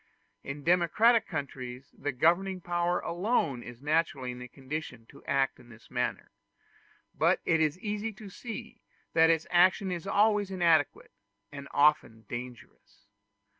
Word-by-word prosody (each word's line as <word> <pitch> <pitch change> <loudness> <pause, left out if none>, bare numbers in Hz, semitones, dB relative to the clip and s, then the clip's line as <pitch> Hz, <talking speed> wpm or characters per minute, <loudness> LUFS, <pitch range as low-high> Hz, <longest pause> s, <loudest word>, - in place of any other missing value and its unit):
In 140 +1 -6
democratic 180 +8 +4
countries 130 -3 -6
the 145 - -3
governing 175 +8 +2
power 175 0 0
alone 170 - 0
is 120 +2 -11
naturally 150 -4 0
in 125 0 -9
a 125 - -7
condition 130 -2 -7
to - - -16
act 135 -1 0
in 120 -1 -17
this 115 -1 -16
manner; - - -2 0.8
but - - +2
it 165 -1 +3
is 155 +1 +1
easy 210 +2 -3
to 210 +1 -11
see 230 +4 -8 0.3
that 160 0 +5
its 165 -1 +2
action 185 +2 +4
is 175 +1 -4
always 205 0 +3
inadequate, 170 -6 +1 0.4
and 140 -1 -8
often 145 -7 +2
dangerous. 120 -3 -9
160 Hz, 140 wpm, -29 LUFS, 135-185 Hz, 0.8 s, that